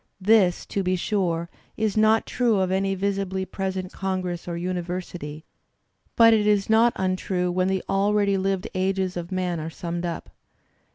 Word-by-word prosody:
This, 195 -2 +3
to 200 - -2
be 185 0 +1
sure, 175 -3 -1 0.3
is 215 -2 0
not 220 +1 +4
true 235 -5 +1
of 185 -1 0
any 195 +1 +1
visibly 195 -1 -1
present 190 -1 -4
congress 185 -3 -3
or 170 -1 -3
university, 175 -3 -5 0.7
but 230 -1 +7
it 210 -1 +2
is 205 0 +2
not 230 +2 +5
untrue 185 -1 -1
when 185 +1 +1
the 190 -1 0
already 200 +1 +2
lived 190 -1 -1
ages 190 0 0
of 175 +1 -5
man 180 -2 -1
are 155 +1 -4
summed 170 +1 -5
up. 170 - -6
190 Hz, 160 wpm, -24 LUFS, 180-200 Hz, 0.7 s, but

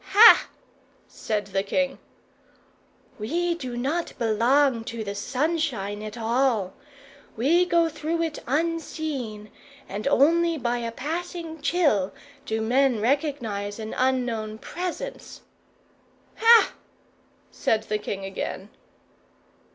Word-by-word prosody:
"Ha!" 445 +3 +9 0.6
said 210 -2 -3
the 195 - +2
king. 270 +7 -1 1.2
"We 340 +11 0
do 255 -8 -6
not 295 +8 -2
belong 235 +2 +2
to 230 -1 -5
the 200 -1 -4
sunshine 250 -3 -2
at 215 +1 -7
all. 230 -4 +1 0.6
We 330 +10 +3
go 340 -1 +3
through 325 +1 -2
it 320 -2 -3
unseen, 295 -7 -3 0.4
and 205 +6 -4
only 330 +4 +3
by 240 -2 -1
a 230 -1 -3
passing 325 +4 -5
chill 285 - +2 0.3
do 220 0 -1
men 250 +1 +2
recognize 230 -6 -1
an 220 -1 -6
unknown 240 -4 0
presence." 365 - -6 1.0
"Ha!" 455 0 +6 0.8
said 220 -1 0
the 215 -1 -2
king 195 -2 -5
again. 195 +1 -5
255 Hz, 105 wpm, -25 LUFS, 215-320 Hz, 1.2 s, Ha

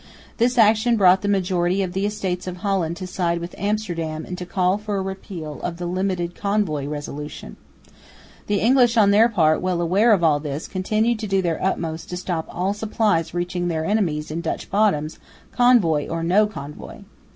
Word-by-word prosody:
This 245 +1 +1
action 225 +1 +4
brought 190 -2 +5
the 205 - -2
majority 185 -1 +1
of 180 -1 -4
the 195 +2 0
Estates 190 -4 -3
of 180 0 -5
Holland 180 -4 -1
to 185 - -6
side 175 -2 -1
with 170 +1 -6
Amsterdam 175 -7 -3
and 180 - -6
to 180 - -6
call 185 +2 +1
for 210 -1 -4
a - - -1
repeal 185 -5 -7
of 170 -1 -4
the 175 - -5
"limited 180 -1 -2
convoy" 200 -9 -1
resolution. 150 0 -7 0.9
The 205 -1 0
English 240 0 +4
on 205 -2 +5
their 220 +4 +5
part, 160 -8 +2
well 185 -1 -1
aware 190 +7 +3
of 195 -5 +3
all 150 -3 +4
this, 145 0 -5
continued 215 +4 0
to 215 - -4
do 195 -1 +1
their 170 -2 -1
utmost 165 -4 -2
to 180 - -4
stop 175 -3 -3
all 185 +3 -1
supplies 205 -6 0
reaching 175 0 -2
their 160 -2 -2
enemies 165 -8 0
in 165 +2 -3
Dutch 165 - -4
bottoms, 195 -7 +1 0.4
convoy 195 -12 +4
or 165 0 -3
no 195 +5 +3
convoy. 150 -8 -9
185 Hz, 185 wpm, -22 LUFS, 165-205 Hz, 0.9 s, brought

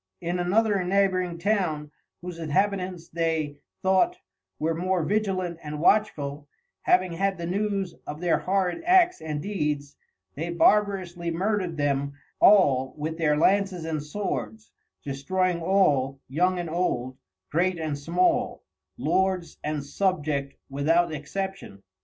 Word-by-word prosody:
In 175 +1 -2
another 200 +2 +2
Neighboring 185 -2 +1
Town, 170 -6 0 0.3
whose 175 -2 -6
Inhabitants 180 +2 -1
they 160 -3 -1 0.3
thought, 190 - +3 0.4
were 160 +2 0
more 180 +1 0
vigilant 185 -3 -1
and 150 0 -6
watchful, 150 -7 +1 0.3
having 360 - +3
had 195 +2 0
the 170 - -4
News 195 0 -1
of 150 +1 -5
their 175 -1 +2
horrid 190 - 0
Acts 360 0 +4
and 150 -2 -4
Deeds, 150 -8 -2 0.4
they 165 +4 -4
barbarously 180 -1 +2
murdered 185 0 -1
them 140 -1 0 0.3
all 135 -10 +5
with 160 +2 -4
their 150 -2 +2
Lances 190 0 +2
and 160 -2 -2
Swords, 125 - -4 0.3
destroying 170 +6 -1
all, 145 -8 +2
Young 180 +7 +1
and 175 -2 -4
Old, 130 -7 -1 0.3
Great 175 +3 +1
and 155 -3 -2
Small, 170 +6 0 0.3
Lords 180 +5 0
and 150 -2 -2
Subject 150 -5 -1
without 160 +5 +2
exception. 155 - -5
170 Hz, 125 wpm, -26 LUFS, 150-190 Hz, 0.4 s, all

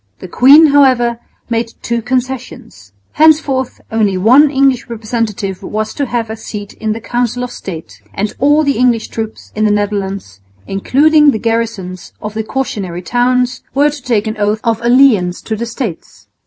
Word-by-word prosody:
The - - -9
queen, 275 - +6
however, 245 -4 +3 0.3
made 230 -1 -2
two 235 0 -1
concessions. 250 - -5 0.2
Henceforth 295 -4 +2
only 210 -4 +1
one 255 +10 +5
English 270 -2 +1
representative 215 -4 -3
was 215 0 -4
to 285 -2 -2
have 230 -2 -2
a - - -4
seat 210 -2 -8
in 220 -1 -3
the 225 - -6
Council 245 +1 -2
of 250 - -5
State; 160 - -9
and 205 +1 -3
all 290 +3 +3
the 280 -5 0
English 240 -3 +1
troops 220 -1 -6
in 215 - -1
the 215 - +3
Netherlands, 200 - -2 0.3
including 295 +10 +3
the 265 - +1
garrisons 225 -5 -3
of 210 -1 -6
the 220 0 -3
cautionary 200 -8 -4
towns, 250 +3 0
were 290 +2 +3
to 290 -2 -9
take 235 -5 0
an 220 0 -4
oath 210 +1 0
of 230 -2 0
allegiance 235 -8 +3
to 220 - -3
the 235 +2 -4
States. 225 - -7
230 Hz, 170 wpm, -14 LUFS, 210-255 Hz, 0.3 s, queen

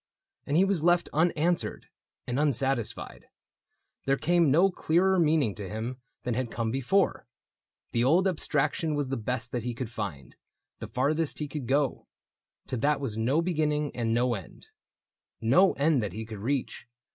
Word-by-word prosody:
And 145 - +1
he 190 - +5
was 195 -5 0
left 175 0 +3
Unanswered 165 +2 +1 0.4
and 125 +3 -2
unsatisfied: 135 -4 -1 0.8
there 135 0 +3
came 170 0 +3
No 175 +8 +4
clearer 185 +3 +2
meaning 155 - +3
to 100 -2 -7
him 115 +4 -5 0.2
than 125 - -1
had 125 +1 -2
come 115 -1 -2
Before; 135 - +1 0.6
the 115 - +1
old 170 +9 +4
abstraction 155 -2 0
was 145 -3 -1
the 135 - -1
best 120 +1 -3
That 120 - -2
he 120 +1 -4
could 120 -1 -5
find, 100 - -6 0.4
the - - -6
farthest 150 +4 0
he 150 - -3
could 140 -3 -6
go; 140 0 0 0.6
To 130 - -3
that 145 +5 +1
was 130 -7 -3
no 130 +9 +1
beginning 150 -4 0
and 115 -2 -1
no 120 +1 +2
end 95 -7 -9 0.4
— - - -65
No 175 +13 +4
end 145 -2 +2
that 105 - -3
he 110 +1 -5
could 110 -2 -8
reach. 130 +1 -3
135 Hz, 170 wpm, -28 LUFS, 120-160 Hz, 0.8 s, he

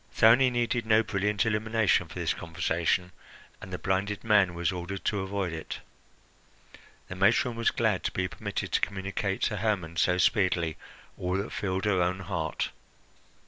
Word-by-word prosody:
Thyone 120 +4 +6
needed 120 -1 0
no 110 0 +5
brilliant 105 -1 0
illumination 110 -1 +2
for - - -12
this - - 0
conversation, 85 +2 -1 0.5
and 95 - -9
the 90 - -3
blinded 100 +2 -1
man 100 -5 +3
was 85 -1 0
ordered 90 +2 -5
to 105 - +1
avoid 95 -2 -2
it. 80 - -5 1.3
The - - -6
matron 110 +5 +3
was 115 0 +2
glad 110 -8 +1
to - - 0
be 95 0 -1
permitted - - -5
to - - +2
communicate 100 0 -2
to 105 - 0
Hermon 95 -6 -1
so 90 +2 +3
speedily 90 -4 +2 0.4
all 90 +1 -1
that 100 +3 -3
filled 95 0 -2
her 100 -3 +2
own 90 +2 0
heart. 85 -4 -3
95 Hz, 160 wpm, -28 LUFS, 90-105 Hz, 1.3 s, Thyone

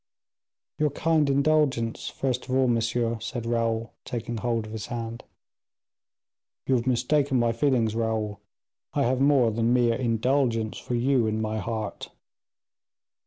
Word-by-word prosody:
"Your 150 0 +3
kind 155 0 +1
indulgence, 140 -5 +1
first 130 -1 -3
of 130 - 0
all, 130 -1 +3
monsieur," 115 0 0
said 115 +1 -5
Raoul, 115 -1 -1
taking 120 -1 -4
hold 115 0 -1
of 110 - -9
his 110 -2 -5
hand. 115 -1 -5 1.4
"You 135 - +1
have 120 0 +1
mistaken 130 +2 +2
my 120 -1 +2
feelings, 115 -3 +1
Raoul, 110 -2 -2 0.6
I - - +2
have 130 +2 +1
more 135 -5 +4
than 115 +2 +1
mere 120 -2 +3
indulgence 115 -1 0
for 120 - -3
you 125 -1 +2
in 110 0 -1
my 110 0 -2
heart." 110 -2 -4
120 Hz, 140 wpm, -26 LUFS, 115-130 Hz, 1.4 s, more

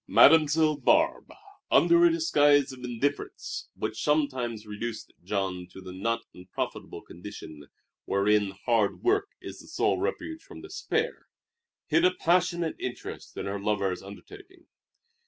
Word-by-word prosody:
Mademoiselle 155 0 +5
Barbe, 310 - +2 0.4
under 345 0 +5
a 345 - +7
disguise 145 - +3
of 125 -1 -12
indifference 125 +4 -3
which 110 - -4
sometimes 130 -7 0
reduced 110 +2 -6
Jean 95 -2 -2
to 95 - -12
the 95 -1 -9
not 115 +5 -1
unprofitable 90 +1 -6
condition 80 -6 -10 0.4
wherein 100 +1 +2
hard 105 +2 0
work 405 +2 +2
is - - -9
the - - -14
sole - - 0
refuge 320 0 -3
from - - -12
despair, 450 +2 -3 0.6
hid 335 - +2
a 365 - +4
passionate 175 -1 +1
interest 125 - -7
in - - -4
her 100 +1 -3
lover's 100 -3 -1
undertaking. 365 - -13
125 Hz, 130 wpm, -28 LUFS, -, 0.6 s, a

